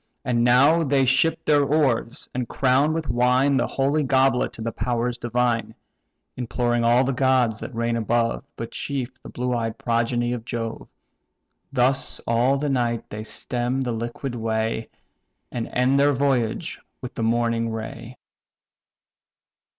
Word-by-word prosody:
And 120 -1 +1
now 135 +7 +5
they 135 -2 +2
ship 135 +5 +2
their 145 -1 +4
oars, 135 -5 0
and 125 -1 -3
crown 135 +3 +2
with 160 -2 -2
wine 125 +4 +3
The 135 - +2
holy 140 +3 +1
goblet 130 -2 +2
to - - -8
the 115 - -2
powers 120 0 -2
divine: 120 -1 0 0.6
Imploring 120 -1 -1
all 120 +2 +4
the 135 +1 0
gods 130 -4 +2
that 130 - -7
reign 115 0 0
above, 115 +1 0
But 115 - -6
chief 135 -3 -4
the - - -10
blue 125 0 -2
eyed 115 -2 -2
progeny 120 +1 0
of 120 -2 -5
Jove. 115 -2 -5 0.8
Thus 130 0 +1
all 120 +4 +2
the 145 +2 -2
night 120 -4 -1
they 105 - -5
stem 125 +3 -2
the 125 -2 -1
liquid 120 +3 -4
way, 110 -1 -2 0.6
And 120 -2 -3
end 130 +2 +2
their 145 +1 +4
voyage 135 +1 -1 0.2
with 125 - -7
the - - -5
morning 115 0 +1
ray. 115 +2 -7
120 Hz, 150 wpm, -23 LUFS, 115-135 Hz, 0.8 s, now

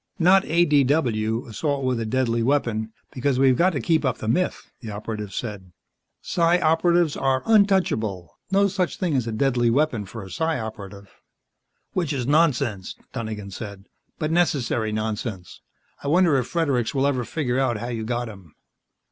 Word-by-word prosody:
"Not 190 +2 +5
ADW 140 -7 +2
assault 140 +4 -2
with 125 -2 0
a 115 - -3
deadly 120 -1 0
weapon 115 -4 0 0.2
because 135 -1 0
we've 130 -1 +4
got 175 +5 +4
to 145 - -1
keep 160 +1 +1
up 130 -3 0
the 110 - -6
myth," 180 +11 -1
the 115 - -8
Operative 105 0 -5
said. 100 -6 -6 0.5
"Psi 170 0 +2
Operatives 165 -1 +3
are 135 -1 0
untouchable. 185 - +2
No 200 +1 +3
such 185 -2 -1
thing 175 -6 0
as 125 -3 0
a - - -2
deadly 120 0 +1
weapon 125 -4 +1
for 110 +1 -8
a 95 - -10
Psi 160 -1 -1
Operative." 100 -3 -8 0.8
"Which 170 -5 -1
is 130 -3 -2
nonsense," 130 - +1 0.2
Donegan 110 -5 -5
said, 100 -1 -8 0.3
"but 155 0 -2
necessary 135 -10 +1
nonsense. 110 -3 -4 0.4
I - - -4
wonder 170 0 +4
if 125 - -1
Fredericks 140 -8 0
will 135 0 +2
ever 130 -3 +1
figure 130 -1 -1
out 130 -4 +1
how 120 +3 -5
you 115 -2 -3
got 120 +1 -2
him." 95 -7 -13
125 Hz, 165 wpm, -24 LUFS, 110-155 Hz, 0.8 s, Not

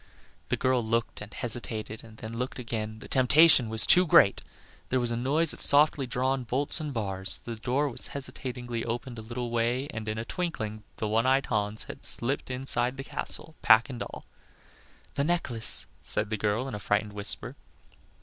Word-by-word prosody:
The - - 0
girl 130 -2 +1
looked 115 0 -2
and 105 +1 -9
hesitated, 110 -2 -3
and 110 -1 -15
then 110 +1 -8
looked 125 +2 -4
again; 110 -3 -5
the - - -12
temptation 135 -1 +5
was 110 0 +3
too 180 - +6
great. 100 -9 +5 0.5
There 130 - +1
was 120 -1 0
a - - -1
noise 145 +7 0
of - - -13
softly 145 -2 +6
drawn 130 +2 -1
bolts 135 +7 +1
and 150 -2 -4
bars, 95 -5 -2
the 115 - -6
door 130 +6 -1
was 130 - 0
hesitatingly 125 -3 -4
opened 120 +1 -5
a - - -7
little 120 +2 -6
way, 120 +3 -1
and, 110 -1 -6
in 110 0 -3
a 115 - -4
twinkling, 115 - -4 0.2
the 110 - -3
one 115 +3 +1
eyed 135 +1 +2
Hans 105 -1 -2
had - - -11
slipped 130 +4 0
inside 125 0 -1
the 135 - -6
castle, 160 +3 -3
pack 115 +4 +5
and 125 - -8
all. - - -8 0.9
"The 140 - -1
necklace," 140 -9 +3 0.2
said 105 0 +3
the - - 0
girl, 105 +5 -1
in 130 - -7
a 105 - -5
frightened 105 +1 -1
whisper. 100 0 -2
120 Hz, 190 wpm, -27 LUFS, 110-130 Hz, 0.9 s, too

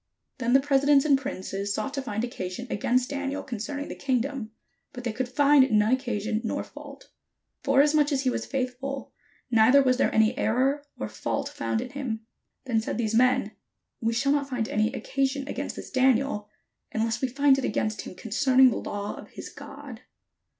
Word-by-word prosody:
Then 245 -1 +1
the 270 - +7
presidents 275 0 +3
and 290 -2 +5
princes 200 -7 -3
sought 275 - -3
to 275 - -2
find 220 -4 -3
occa 215 -7 -4
sion 185 +7 -6
against 250 +5 +1
Daniel 280 0 -3
concerning 280 +5 -5
the - - -6
kingdom; 260 -2 -2 0.4
but 250 -2 -8
they 235 -3 -2
could 255 +2 -3
find 280 0 +5
none 215 +1 +3
occasion 225 -4 -1
nor 225 - -2
fault; - - -12 0.5
forasmuch 295 +2 +3
as 275 -2 +1
he 260 - +2
was - - -3
faithful, 265 +1 -4 0.4
neither 240 +5 +6
was 255 -1 +3
there - - +2
any 220 0 +3
error 270 +5 +1
or - - -3
fault 280 0 -3
found 285 -6 -2
in 250 0 -7
him. 240 -6 -4 0.4
Then 230 -4 +1
said 220 - -4
these 225 -2 -1
men, 250 -2 +3 0.5
"We 230 0 +1
shall 275 +4 +1
not 285 -1 0
find 245 -4 -1
any 215 +1 +1
occa 270 +1 -1
sion 275 0 -5
against - - -4
this - - -9
Daniel, 260 -5 +2 0.4
except 225 +1 -1
we 265 - +1
find 270 +1 +3
it - - -4
against 215 -1 -1
him - - -9
concerning 255 +5 +4
the - - -2
law 205 0 -4
of - - -11
his - - -9
God." - - -10
255 Hz, 185 wpm, -26 LUFS, 225-275 Hz, 0.5 s, the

